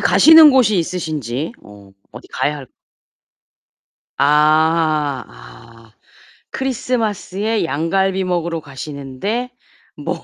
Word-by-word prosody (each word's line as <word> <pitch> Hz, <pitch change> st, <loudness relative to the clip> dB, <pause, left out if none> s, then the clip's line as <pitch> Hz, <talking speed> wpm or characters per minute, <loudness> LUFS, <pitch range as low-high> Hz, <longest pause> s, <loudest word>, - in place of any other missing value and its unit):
가시는 320 Hz, -1 st, +7 dB
곳이 230 Hz, -8 st, +3 dB
있으신지? 155 Hz, -, -4 dB
어 100 Hz, -1 st, -16 dB, 0.2 s
어디 -, -, -12 dB
가야 150 Hz, +1 st, -1 dB
할 135 Hz, -3 st, -12 dB, 1.5 s
아 155 Hz, 0 st, +2 dB
아 110 Hz, -, -16 dB, 0.6 s
크리스마스에 225 Hz, -5 st, -2 dB
양갈비 190 Hz, +5 st, -1 dB
먹으러 170 Hz, -2 st, -2 dB
가시는데 145 Hz, -, -6 dB, 0.5 s
뭘 -, -, -4 dB
160 Hz, 200 characters per minute, -18 LUFS, 140-200 Hz, 1.5 s, 가시는